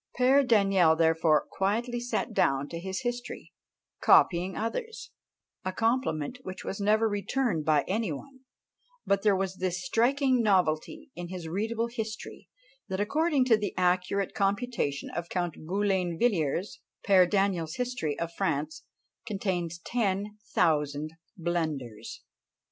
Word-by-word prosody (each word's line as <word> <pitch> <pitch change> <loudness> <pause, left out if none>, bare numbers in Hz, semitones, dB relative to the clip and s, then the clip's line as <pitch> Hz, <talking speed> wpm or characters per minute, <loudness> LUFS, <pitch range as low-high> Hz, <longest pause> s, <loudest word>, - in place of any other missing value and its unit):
Père 265 +2 +5
Daniel, 195 -8 +4
therefore, 160 -1 +3
"quietly 230 +5 -1
sat 240 -1 -2
down 135 -6 +2
to 165 - -5
his 190 +4 -4
history," 245 -1 -5 0.5
copying 180 +1 +4
others 445 - -4 0.5
a 185 - -2
compliment 230 - -1
which 185 -5 -8
was 195 - -4
never 215 +2 +3
returned 205 - -1
by 150 -2 +3
any 210 -1 -1
one: 260 - -8 0.7
but 200 0 +2
there 205 -2 +4
was 190 -1 -2
this 185 +4 -2
striking 260 +1 +2
novelty 200 - +1
in 175 0 -6
his 175 -2 -6
"readable 220 +7 -1
history," 225 -2 -6 0.4
that 190 -1 -3
according 285 +5 +2
to 240 -3 +5
the 205 -3 -3
accurate 185 +2 +1
computation 200 - -1
of 170 0 -5
Count 175 -3 -1
Boulainvilliers, 185 - 0 0.3
Père 185 -3 +6
Daniel's 190 -5 0
history 245 - -2
of 170 0 -4
France 155 -4 -2 0.5
contains 180 -5 -2
ten 205 +1 -2 0.2
thousand 150 -1 +1 0.3
blunders! 155 - -3
195 Hz, 125 wpm, -28 LUFS, 170-230 Hz, 0.7 s, Père